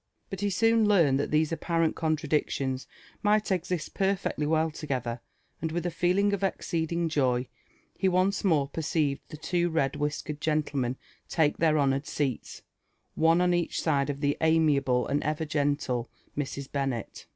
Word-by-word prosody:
But 195 -1 -5
he 205 - +1
soon 225 +3 +3
learned 165 -10 +4
that 145 - -1
these 155 +1 +2
apparent 165 0 0
contradictions 150 -4 -1 0.3
might 210 0 +2
exist 180 -3 -2
perfecdy 190 -6 0
wgll 160 0 +1
together, 125 -6 -3 0.4
and 160 - -2
with 175 +1 -2
a 175 - 0
feeling 180 +5 +2
of 200 - -2
exceeding 170 -3 -1
joy 130 -5 +1 0.5
he 190 - +1
once 185 +2 +1
more 155 -8 +3
perceived 150 -2 -1
the 155 - -8
two 175 +2 0
red 150 -5 0
whiskered 150 0 -3
genllemen 145 -5 0 0.3
take 155 -3 +2
their 160 -2 +3
honoured 140 0 +1
seats, 135 -5 -3 0.5
one 165 +2 +3
op 180 0 +3
each 175 -1 0
Side 140 -2 0
the 145 -1 +1
amiable 145 -6 +3
and 145 +1 0
ever 155 +1 -1
gen(le 145 -5 0 0.3
Mrs. 140 -1 -4
Bennet. 135 -5 -3
155 Hz, 150 wpm, -28 LUFS, 140-175 Hz, 0.5 s, learned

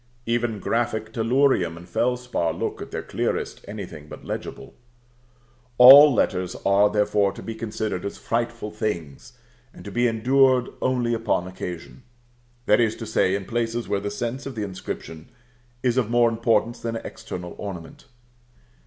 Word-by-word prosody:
Even 115 -1 0
graphic 110 0 -2
tellurium 115 -7 +2
and 85 +1 -12
felspar 125 -7 -1
look, - - -3
at - - -7
their - - -5
clearest, - - -3
anything 95 -8 -8
but - - -11
legible. - - -6 1.0
All 140 +4 +10
letters 90 -6 0
are, 100 +1 +4
therefore, 105 -1 +2
to - - -10
be 115 - -5
considered 110 -4 -4
as 100 - -5
frightful 115 -2 -3
things, 105 - -5 0.4
and - - -13
to 100 - -7
be 120 +2 +2
endured 125 +2 +3
only 125 -2 +1
upon 115 -6 0
occasion; 90 +3 -7 0.6
that 105 - +4
is 115 -2 +2
to 115 - -7
say, 100 -3 +1
in 100 -1 -4
places 115 +1 -2
where 100 - 0
the 100 +1 -4
sense 120 +6 -4
of 135 - -7
the 110 - -3
inscription 90 -4 -7 0.5
is 125 -1 +1
of 120 -4 +1
more 120 0 +4
importance 115 0 +1
than 115 0 -4
external 100 -6 -7
ornament. 100 - -8
115 Hz, 155 wpm, -24 LUFS, 100-120 Hz, 1.0 s, All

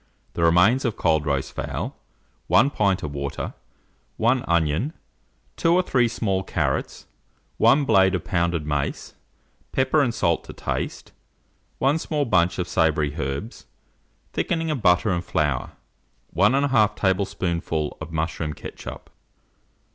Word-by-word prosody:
The - - -3
remains 90 +10 +4
of 115 -4 -1
cold 80 -3 +1
roast 70 -2 -1
fowl, - - -4 0.5
1 140 - +4
pint 100 -6 +1
of 75 -2 -4
water, 70 -1 -4 0.6
1 120 +3 +2
onion, 85 - +1 0.6
2 165 +1 +3
or 185 - +3
three 125 -8 +2
small 105 -5 -1
carrots, 95 - -2 0.5
1 145 0 +4
blade 95 -5 +4
of 90 - -3
pounded 85 -3 0
mace, 75 -2 -3 0.6
pepper 130 +3 +2
and 130 -4 +2
salt 85 -7 0
to - - -9
taste, - - -4 0.7
1 140 +4 +2
small 150 -3 -1
bunch 90 -6 +2
of 90 - -2
savoury 75 -2 +1
herbs, 70 - -5 0.7
thickening 165 -1 -1
of 140 -6 -2
butter 90 +2 +3
and 85 -1 -1
flour, 75 -6 -1 0.6
1 100 +6 +4
1/2 135 -7 +3
tablespoonful 90 -5 -1
of 80 +1 -7
mushroom 80 -1 -2
ketchup. - - -9
95 Hz, 130 wpm, -24 LUFS, 80-120 Hz, 0.7 s, remains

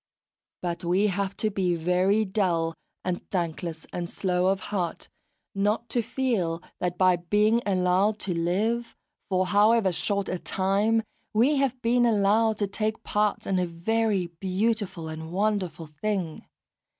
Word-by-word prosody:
But 175 0 -3
we 180 +4 +2
have 200 0 -2
to 215 - 0
be 185 -3 +1
very 180 +6 +2
dull 175 -5 0 0.3
and 180 -1 -1
thankless 170 -2 -3
and 175 -1 -3
slow 180 -1 0
of 195 0 +2
heart 175 -4 -2 0.5
not 210 +4 0
to 240 - +1
feel 220 -9 -1 0.2
that 180 0 -2
by 185 -1 +4
being 210 +6 +2
allowed 190 +2 +2
to 185 - -2
live, 205 +8 0 0.3
for 185 -1 +2
however 205 +2 +4
short 200 +3 -1
a 180 - -2
time, 205 +6 +1 0.3
we 265 +7 +4
have 265 -2 0
been 240 +1 +3
allowed 215 0 +3
to 205 - +1
take 215 +2 -2
part 210 0 0
in 190 -1 +1
a 180 - 0
very 200 +3 0
beautiful 190 +1 -2
and 160 +1 -7
wonderful 190 -4 -1
thing. 165 +2 -3
195 Hz, 145 wpm, -26 LUFS, 175-215 Hz, 0.5 s, by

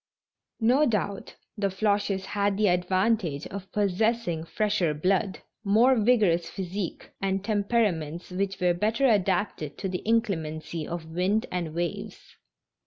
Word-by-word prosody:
No 255 +7 +4
doubt 205 -3 -2 0.2
the 205 -2 0
Floches 200 -1 0
had 200 0 0
the 210 -2 +3
advantage 180 -3 +1
of 195 -1 -8
possessing 205 -3 0
fresher 195 -5 0
blood, 190 +5 0 0.2
more 225 +6 +5
vigorous 210 -7 +3
physiques, 190 0 -5
and 195 0 0
temperaments 200 -7 0
which 195 +1 -2
were 180 -1 +3
better 220 +9 +1
adapted 195 - +1
to 195 - -3
the 180 -1 -3
inclemency 165 -8 -1
of 170 -1 -5
wind 185 +6 +1
and 170 -3 -3
waves. 170 -1 -4
195 Hz, 125 wpm, -27 LUFS, 175-215 Hz, 0.2 s, more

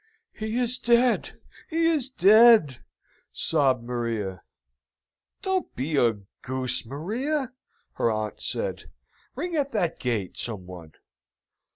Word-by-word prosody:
"He 220 +2 -4
is 250 0 +1
dead 240 +1 +2 0.3
he 330 0 +1
is 305 -6 +1
dead!" 215 - +5 0.5
sobbed 135 -6 +1
Maria. 115 -6 -3 1.0
"Don't 380 -1 -2
be 150 +5 -2
a 120 -4 +4 0.3
goose, 130 -2 -1
Maria!" 245 - -3 0.4
her - - +1
aunt 110 -1 -4
said. - - -2 0.5
"Ring 340 +6 -3
at 280 -4 -1
that 175 -6 -1
gate, 115 -7 -2
some 105 -6 -4
one!" 85 -4 -11
160 Hz, 110 wpm, -26 LUFS, -, 1.0 s, dead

